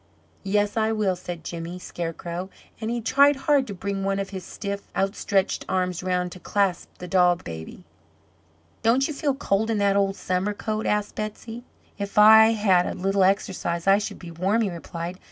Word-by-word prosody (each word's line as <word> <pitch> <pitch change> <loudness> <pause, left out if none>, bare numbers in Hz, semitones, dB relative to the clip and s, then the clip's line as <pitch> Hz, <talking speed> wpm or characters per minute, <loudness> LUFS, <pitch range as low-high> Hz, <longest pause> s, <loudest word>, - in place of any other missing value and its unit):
"Yes, 205 +2 0
I 220 0 +2
will," 205 -4 +1
said 175 -2 -7
Jimmy 170 +2 -6
Scarecrow, 175 +1 -5 0.3
and 220 -1 -3
he 240 0 -2
tried 280 +5 +4
hard 270 0 +2
to 200 - -6
bring 195 +1 -3
one 195 0 0
of 195 0 -4
his 190 -2 -6
stiff, 200 +1 -6
outstretched 195 0 0
arms 180 -2 -1
around 180 -1 -1
to 185 - -10
clasp 195 -2 0
the 180 - -8
doll 180 -1 +4
baby. 80 - -9 1.0
"Don't 250 +4 +3
you 310 - -4
feel 280 -1 -1
cold 220 -4 0
in 225 - +1
that 200 -1 +2
old 195 -1 +2
summer 185 +3 -1
coat?" 215 +1 -3
asked 210 0 0
Betsey. 225 +2 -6 0.4
"If 200 0 -5
I 220 +1 +8
bad 190 -4 +3
a - - -4
little 195 +1 +1
exercise, 185 -3 0
I 195 +1 +5
should 210 - -5
be 175 -2 -10
warm," 190 +7 +1
he 200 - -1
replied. 170 +1 -6
195 Hz, 185 wpm, -24 LUFS, 180-215 Hz, 1.0 s, I